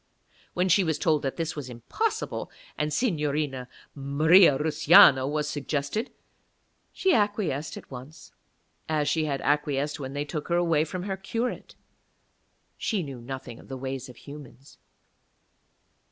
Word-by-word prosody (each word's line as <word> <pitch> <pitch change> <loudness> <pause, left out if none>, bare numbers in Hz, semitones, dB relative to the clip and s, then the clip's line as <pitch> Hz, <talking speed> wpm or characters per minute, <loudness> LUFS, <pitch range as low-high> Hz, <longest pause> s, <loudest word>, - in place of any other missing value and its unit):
When 180 +1 +1
she 195 +1 +4
was 160 -3 0
told 155 -1 +2
that 135 - -3
this 165 0 -3
was 145 -4 -6
impossible 125 - -3 0.3
and 150 0 -1
Signorina 150 - -1 0.3
Maria 150 +3 +5
Russiano 145 -3 +6
was 150 0 -1
suggested, 150 - -2 0.8
she 380 -1 +1
acquiesced 200 - 0
at - - -12
once, 130 +5 -11 0.6
as 150 -2 0
she 155 +1 +1
had 140 -2 -2
acquiesced 150 0 0
when 135 -1 -6
they 145 +1 -2
took 150 0 -5
her 170 - +1
away 165 -3 +2
from 180 +3 -5
her 195 -1 -3
curate; 230 +5 -4 1.0
she 205 -6 -1
knew 135 -5 -8
nothing 130 -1 -7
of - - -15
the 135 - -6
ways 130 0 -5
of 125 - -12
humans. 140 -1 -13
150 Hz, 140 wpm, -27 LUFS, 135-170 Hz, 1.0 s, Russiano